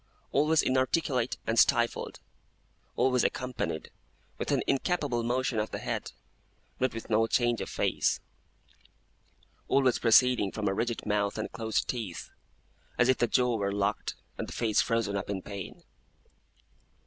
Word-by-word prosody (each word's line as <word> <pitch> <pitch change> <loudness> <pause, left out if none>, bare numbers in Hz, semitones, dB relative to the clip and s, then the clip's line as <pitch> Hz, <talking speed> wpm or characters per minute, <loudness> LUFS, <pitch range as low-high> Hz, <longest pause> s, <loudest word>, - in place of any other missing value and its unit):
Always 150 +2 +3
inarticulate 130 -1 +1
and 115 0 +2
stifled. 120 -3 +2 0.7
Always 125 -1 +2
accompanied 125 -10 -2 0.5
with - - -2
an - - +2
incapable 140 -4 0
motion 120 0 0
of 105 - -1
the - - -4
head, - - -4 0.7
but 130 -2 0
with 115 - -6
no 110 +1 +3
change 120 0 +1
of - - -4
face. - - 0 1.5
Always 130 -3 +3
proceeding 120 -3 +4
from 110 -2 -3
a 95 - +1
rigid 115 +3 -2
mouth 105 -1 0
and 110 - -3
closed 110 -1 -1
teeth, 110 -9 -5 0.7
as 125 - +4
if 130 - +3
the 120 - +3
jaw 125 0 +2
were 100 -1 -1
locked 100 +1 -1 0.2
and - - -3
the - - -7
face 110 -3 +2
frozen 115 -4 0
up 100 0 -3
in 95 -2 -3
pain. 100 -3 -8
115 Hz, 145 wpm, -29 LUFS, 105-125 Hz, 1.5 s, proceeding